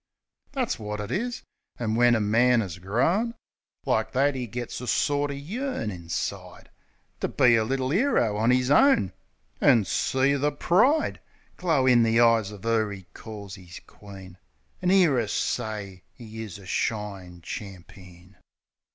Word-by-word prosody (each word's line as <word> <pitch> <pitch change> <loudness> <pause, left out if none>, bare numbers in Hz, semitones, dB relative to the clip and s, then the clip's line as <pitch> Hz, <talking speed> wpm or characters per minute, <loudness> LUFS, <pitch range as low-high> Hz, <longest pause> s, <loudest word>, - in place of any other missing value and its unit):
That's 255 - -2
wot 105 -1 -5
it 105 +2 -5
is. 240 - -3 0.3
An' 110 -2 -2
when 120 +1 +4
a - - +1
man 115 +3 +3
'as 90 -3 -7
grown 160 - 0 0.5
Like - - 0
that 140 +2 +2
'e 125 -2 -4
gets 120 +2 -6
a 125 - -7
sorter 145 +1 0
yearn 180 - -4
inside 85 -3 -6 0.5
To - - -1
be 120 -2 +4
a 110 - +2
little 130 +3 -1
'ero 185 - +2
on 110 +3 +2
'is 125 +1 +2
own; 145 - +4 0.5
An' 110 -4 +5
see 130 +8 +1
the 145 +1 +1
pride 220 - +2 0.4
Glow 160 -7 +1
in 125 -2 +5
the 115 0 +3
eyes 115 -3 +4
of 105 0 -11
'er 110 -2 +1
'e 95 -2 -9
calls 100 -3 -9
'is 85 -2 -11
queen; 95 -2 -13 0.4
An' 180 - +1
'ear 180 -9 +4
'er 115 - -1
say 105 -5 -3 0.2
'e 110 -1 -8
is 105 -4 -7
a 100 - -14
shine 95 -3 -3
champeen. 90 -1 -10
115 Hz, 155 wpm, -26 LUFS, 100-140 Hz, 0.5 s, An